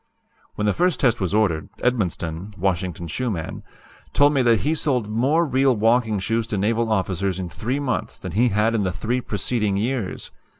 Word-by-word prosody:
"When 105 - -1
the 105 - +3
first 180 -1 +1
test 120 -5 +2
was 95 - 0
ordered, 90 -8 +1
Edmonston 100 -5 -2
(Washington 90 -2 -1
shoe 125 +10 -2
man) 80 -7 -4 0.5
told 145 +1 +5
me 135 - +3
that 120 -3 +3
he 150 - +1
sold 130 -8 0
more 140 +10 +2
real 135 -2 +2
walking 115 0 +2
shoes 115 +3 -1
to 105 - -2
naval 110 +3 +1
officers 95 -2 0
in 90 -2 -4
three 115 - -3
months 130 -5 -2
than 95 - -7
he 115 +8 +3
had 105 +2 +2
in 115 - +1
the 95 -2 0
three 115 +6 -2
preceding 105 -1 -1
years. 115 -2 -3
110 Hz, 185 wpm, -23 LUFS, 95-125 Hz, 0.5 s, told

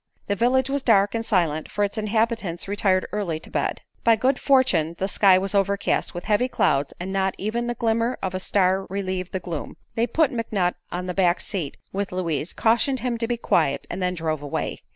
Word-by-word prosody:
The 200 - 0
village 255 +4 +2
was 280 +1 -1
dark 205 -5 +4
and 230 0 -1
silent, 165 -8 0
for 205 - -1
its 200 +1 -1
inhabitants 220 -5 -1
retired 195 -2 +1
early 185 -7 -2
to - - -12
bed. - - -1 0.2
By 230 -1 +6
good 255 +4 +1
fortune 190 - +3
the 190 - -1
sky 195 -2 +5
was 195 +1 -1
overcast 200 -1 0
with 175 - -5
heavy 215 +4 +2
clouds 145 - +1
and 185 +2 -4
not 190 -1 0
even 235 +4 -2
the 240 - -2
glimmer 230 +1 0
of 190 - -3
a 185 - -2
star 190 0 +1
relieved 185 -2 -3
the 190 - -2
gloom. 170 -4 -6 0.2
They 230 0 +1
put 315 0 +2
McNutt 210 -6 0 0.2
on 180 +1 -3
the 180 - -3
back 180 -1 +2
seat 170 -9 -4 0.2
with 200 0 -2
Louise, 170 -4 -2
cautioned 240 +4 +2
him 245 -2 -2
to 230 - 0
be 240 0 -1
quiet, 140 -10 +1
and - - -4
then 180 0 0
drove 160 -3 -2
away. 145 -1 -3
195 Hz, 210 wpm, -24 LUFS, 180-230 Hz, 0.2 s, By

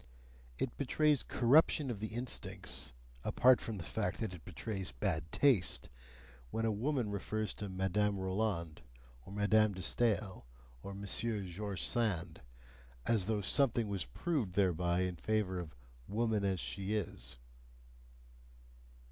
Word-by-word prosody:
It 125 - -2
betrays 150 +1 +3
corruption 140 +2 +4
of 110 - -5
the 110 - -2
instincts 125 +1 -2 0.3
apart 130 0 +5
from 110 -2 -4
the 90 - -5
fact - - -2
that 110 -5 -2
it 85 - -10
betrays 95 +4 -4
bad 80 -5 -2
taste 125 -11 +3 0.6
when 115 - -1
a 110 - +2
woman 120 +1 0
refers 110 +1 -2
to 105 - -6
Madame 95 +2 +1
Roland, 95 -4 -1 0.5
or - - -9
Madame 105 +1 +3
de 95 -1 -6
Stael, 105 - 0 0.3
or 100 +5 -7
Monsieur 100 +2 0
George 95 +2 -3
Sand, 105 -8 0 0.6
as 105 -5 +2
though 110 -2 +1
something 120 +1 +3
were 100 -1 -2 0.2
proved 140 - -1
thereby 90 -2 +2
in 90 -1 -1
favour 105 -2 0
of 80 -5 -7 0.3
"woman 110 0 +1
as 95 -2 +1
she 100 +5 -2
is." - - -4
105 Hz, 135 wpm, -35 LUFS, 95-115 Hz, 0.6 s, apart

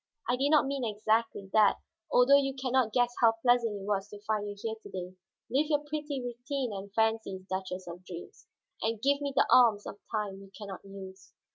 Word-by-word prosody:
I 245 - +2
did 275 +3 +1
not 305 -2 +5
mean 275 -1 -2
exactly 220 -1 0
that, 210 -2 +5 0.3
although 250 +3 +6
you 270 -1 -2
can 260 -2 -3
not 255 -4 +3
guess 245 +1 +2
how 230 -1 +6
pleasant 230 -2 +2
it 195 - -8
was 200 -1 -1
to 205 - -10
find 210 -1 -1
you 205 - -6
here 225 +1 -3
to - - -11
day. 185 0 -6 0.3
Live 285 +5 +1
your 295 -1 +1
pretty 295 -1 -4
routine 245 0 -3
and 195 0 -7
fancies, 220 -3 0
Duchess 185 -1 -4
of 175 +1 -8
Dreams, 180 - -10 0.3
and 225 0 -1
give 280 +4 +2
me 285 -1 -1
the 270 - +5
alms 225 -5 +6
of 205 - -8
time 205 -3 -3
you 195 - -13
can 205 -2 -8
not 190 - -8
use." 190 -2 -11
220 Hz, 215 wpm, -30 LUFS, 195-255 Hz, 0.3 s, although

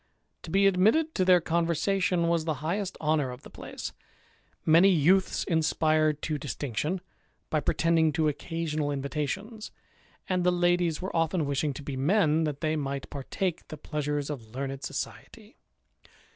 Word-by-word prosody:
To - - -9
be 195 +4 +3
admitted 220 - +3
to 185 - +1
their 180 -1 +6
conversation 170 +2 +1
was 170 -1 +1
the 160 -2 0
highest 195 +3 -2
honour 150 -3 +1
of 125 +1 -9
the - - -12
place; - - -7 0.7
many 165 +5 +6
youths 185 +2 +3
inspired 155 -2 +1
to 155 -2 -2
distinction, 145 - -3 0.5
by 155 - +2
pretending 160 +2 +2
to 160 0 +1
occasional 155 0 -2
invitations; 150 - -3 0.6
and 180 -1 0
the 180 - +4
ladies 175 -1 +1
were 190 - -4
often 165 0 +1
wishing 140 +1 0
to 145 - -7
be 140 -1 -5
men, 160 +2 +2
that 145 -2 -4
they 155 -1 0
might 140 -2 -4
par 140 -2 -6
take 185 -4 -2
the 155 - -8
pleasures 145 0 -3
of 115 -5 -8
learned 135 0 -4
society. - - -7
160 Hz, 155 wpm, -28 LUFS, 145-180 Hz, 0.7 s, their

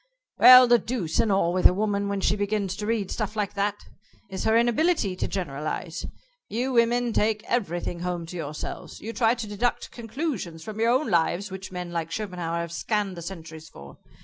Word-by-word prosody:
"Well, 255 0 +10
the 240 0 +5
deuce 200 -12 -2
and 220 - +3
all 185 -3 +2
with 185 0 +6
a 180 - 0
woman 200 0 0
when 200 -1 -2
she 200 - +2
begins 205 -2 -1
to 210 - -4
read 220 -4 -1
stuff 215 -1 -3
like 210 -2 -2
that 205 0 -1 0.5
is 190 - -4
her 220 +1 +4
inability 235 - +2
to - - -2
generalize. 160 0 -4 0.4
You 245 +4 -1
women 240 0 +2
take 215 0 +1
everything 175 -7 -2
home 175 -1 -3
to 170 - -9
yourselves. 155 -3 -6
You 225 +2 -6
try 230 0 +3
to 230 -2 -5
deduct 210 +4 -2
conclusions 225 - -4
from 215 +3 -7
your 230 +1 +3
own 255 0 +1
lives 175 +3 +1
which 190 0 -7
men 180 -1 -5
like 165 -1 -3
Schopenhauer 175 -3 -3
have 170 -1 -5
scanned 200 +2 -1
the 170 - -7
centuries 160 -3 -9
for. 70 0 -13
200 Hz, 195 wpm, -26 LUFS, 175-225 Hz, 0.5 s, Well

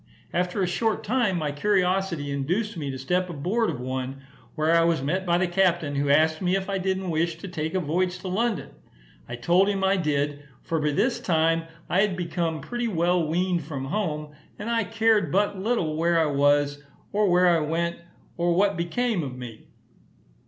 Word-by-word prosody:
After 180 +2 0
a - - +1
short 220 +5 0
time 220 -5 +1
my 150 -3 -1
curiosity 180 -2 0
induced 175 +11 -1
me 150 -4 -4
to 135 - -4
step 180 +7 -1
aboard 185 +9 0
of - - -4
one, 130 +2 -4 0.3
where 160 +1 +2
I 165 - +5
was 165 -4 +1
met 185 +6 -1
by 170 0 +3
the 185 +1 +1
captain, 175 -5 +1
who 140 0 0
asked 155 +2 +3
me 180 0 +1
if 195 -1 -2
I 195 - 0
didn't 190 -1 -1
wish 165 +1 0
to 195 - -8
take 160 -1 -4
a - - +2
voyage 180 +3 0
to 190 - -6
London? 220 +4 -1 0.6
I 120 - -4
told 175 +11 +3
him 195 -1 -1
I 195 +1 +3
did, 145 -3 -1 0.2
for 165 - -1
by 150 0 +1
this 240 - +1
time 165 -1 +1 0.2
I 185 - +2
had 200 -3 +1
become 170 -3 -2
pretty 240 - -3
well 175 -3 +1
weaned 175 +2 0
from 140 -3 -5
home, 150 -3 -3 0.2
and 220 +3 -4
I 230 -2 +1
cared 220 -5 +2
but 200 0 +1
little 190 -7 0
where 170 +1 +2
I 160 - +3
was, 145 +1 +2 0.3
or 205 -1 +2
where 180 +1 +4
I 170 -1 +4
went, 165 +3 -1 0.4
or 170 0 +1
what 200 +2 +3
become 205 +4 0
of 130 -4 -5
me. 120 -3 -9
170 Hz, 195 wpm, -25 LUFS, 150-190 Hz, 0.6 s, I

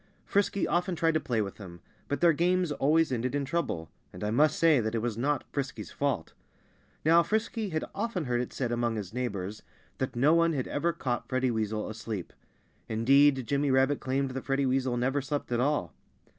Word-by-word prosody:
Frisky 200 0 +1
often 175 +1 0
tried 165 0 +2
to 155 - +2
play 115 -7 0
with 95 - -7
him. 85 -4 -10 0.3
But 145 - -2
their 170 -1 +6
games 180 +1 +1
always 155 +2 +2
ended 125 +2 -1
in 145 -1 0
trouble; 130 - -2 0.2
and - - -8
I 105 - 0
must 150 +6 +3
say 160 -4 +5
that 110 0 -1
it 115 - 0
was 120 -3 -1
not 140 +4 0
Frisky's 140 -1 -4
fault. 135 - -2 0.7
Now, 165 +2 +6
Frisky 220 +2 -1
had 160 -2 -2
often 205 -6 -2
heard 120 -1 0
it 125 - -5
said 125 -3 -2
among 120 -1 0
his 105 -2 -5
neighbors 105 -5 -3 0.4
that 130 - -2
no 140 +6 +4
one 165 0 +3
had 130 -4 -2
ever 170 +4 0
caught 125 -6 -3
Freddie 130 -1 +1
Weasel 110 -1 -2
asleep. 110 -4 -6 0.6
Indeed, 135 +4 +4
Jimmy 140 +3 0
Rabbit 135 +2 +3
claimed 135 +1 -1
that 130 0 -5
Freddie 135 0 +1
Weasel 130 -1 +1
never 135 +4 +1
slept 145 -1 -4
at 120 - +1
all. 145 +4 0
135 Hz, 200 wpm, -29 LUFS, 120-155 Hz, 0.7 s, their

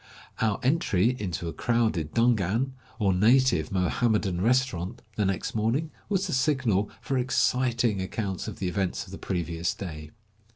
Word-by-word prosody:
Our 110 -3 +1
entry 125 - +2
into 90 -3 -3
a 80 - -4
crowded 110 -10 0
dungan, 115 +1 +2 0.3
or 100 -4 +2
native 115 - +3
Mohammedan 95 0 +1
restaurant, 115 -6 0
the 105 - +1
next 95 -2 -1
morning, 115 +9 0 0.2
was 195 -2 +1
the 180 - -3
signal 130 -7 +2 0.2
for - - -4
153 130 - +2
exciting 125 -4 +1
accounts 95 0 -3
of - - -6
the 95 - -2
events 95 +1 -1
of 90 - -13
the 95 - -8
previous 85 -2 -2
day. 75 -5 -7
105 Hz, 155 wpm, -27 LUFS, 90-125 Hz, 0.3 s, native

